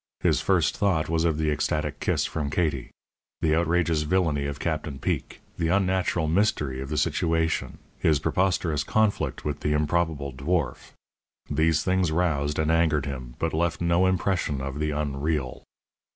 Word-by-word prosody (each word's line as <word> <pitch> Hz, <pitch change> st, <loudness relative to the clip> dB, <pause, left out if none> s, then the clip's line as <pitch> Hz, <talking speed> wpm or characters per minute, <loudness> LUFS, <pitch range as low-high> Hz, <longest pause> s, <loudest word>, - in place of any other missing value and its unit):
His -, -, +2 dB
first -, -, +2 dB
thought 90 Hz, -7 st, +1 dB
was 80 Hz, 0 st, +1 dB
of 80 Hz, -3 st, +1 dB
the 80 Hz, -1 st, +1 dB
ecstatic 75 Hz, -, -1 dB
kiss -, -, 0 dB
from 75 Hz, -2 st, -3 dB
Katie. 75 Hz, -5 st, -1 dB, 0.5 s
The 80 Hz, -1 st, +2 dB
outrageous 85 Hz, -1 st, +2 dB
villainy 75 Hz, -3 st, +1 dB
of 70 Hz, 0 st, -5 dB
Captain 75 Hz, -4 st, -2 dB
Peek, -, -, -3 dB, 0.2 s
the 85 Hz, -, +1 dB
unnatural 95 Hz, -2 st, +1 dB
mystery 75 Hz, -7 st, +1 dB
of 70 Hz, -, -6 dB
the 75 Hz, -, -2 dB
situation, 80 Hz, +2 st, 0 dB, 0.2 s
his 75 Hz, -2 st, +3 dB
preposterous 80 Hz, -1 st, 0 dB
conflict 110 Hz, -2 st, 0 dB
with 75 Hz, -3 st, -2 dB
the 75 Hz, -, 0 dB
improbable 75 Hz, -2 st, 0 dB
dwarf 75 Hz, +2 st, -2 dB, 0.6 s
these 80 Hz, +1 st, +2 dB
things 95 Hz, -3 st, +1 dB
roused 75 Hz, -4 st, 0 dB
and 80 Hz, 0 st, +1 dB
angered 80 Hz, -3 st, +2 dB
him, 65 Hz, -4 st, -6 dB
but 80 Hz, -, -1 dB
left 85 Hz, +1 st, 0 dB
no 85 Hz, +2 st, +3 dB
impression 90 Hz, -6 st, 0 dB
of 70 Hz, +1 st, -5 dB
the 75 Hz, 0 st, 0 dB
unreal. 75 Hz, -2 st, -2 dB
80 Hz, 155 wpm, -26 LUFS, 75-85 Hz, 0.6 s, his